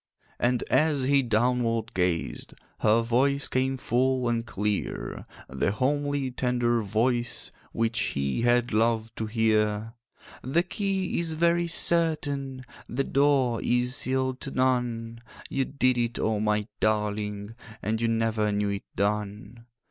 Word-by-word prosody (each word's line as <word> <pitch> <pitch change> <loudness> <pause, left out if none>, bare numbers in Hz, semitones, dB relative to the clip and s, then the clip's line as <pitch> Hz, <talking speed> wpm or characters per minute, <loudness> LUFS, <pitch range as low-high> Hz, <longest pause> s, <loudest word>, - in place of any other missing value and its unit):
And 120 0 +1
as 150 -3 +2
he 140 +1 +4
downward 115 -1 0
gazed, 90 -2 -1 0.2
Her 110 +2 +3
voice 135 +4 +2
came 130 +1 0
full 130 +1 +1
and 115 -1 0
clear, 105 - -3 0.2
The 65 +9 -1
homely 145 +2 0
tender 120 -2 +1
voice 120 +4 0 0.2
Which 115 0 0
he 70 - -1
had 120 -1 +2
loved 115 0 +1
to 110 - -2
hear: 110 -1 +1 0.5
'The 155 +7 +1
key 190 -1 -1
is 165 -1 -1
very 170 +2 +2
certain, 145 -6 0 0.2
The 130 +4 -1
door 135 -4 +2
is 125 +1 +1
sealed 130 -1 0
to 140 - -5
none. 120 -3 -1 0.3
You 135 -1 +1
did 130 -3 +1
it, 120 0 -1
oh, 110 -1 0
my 105 0 0
darling! 105 -1 -1 0.3
And 110 +2 -1
you 115 - +2
never 115 -2 +1
knew 105 0 0
it 100 -1 -4
done. 105 +3 -3
120 Hz, 135 wpm, -27 LUFS, 110-130 Hz, 0.5 s, he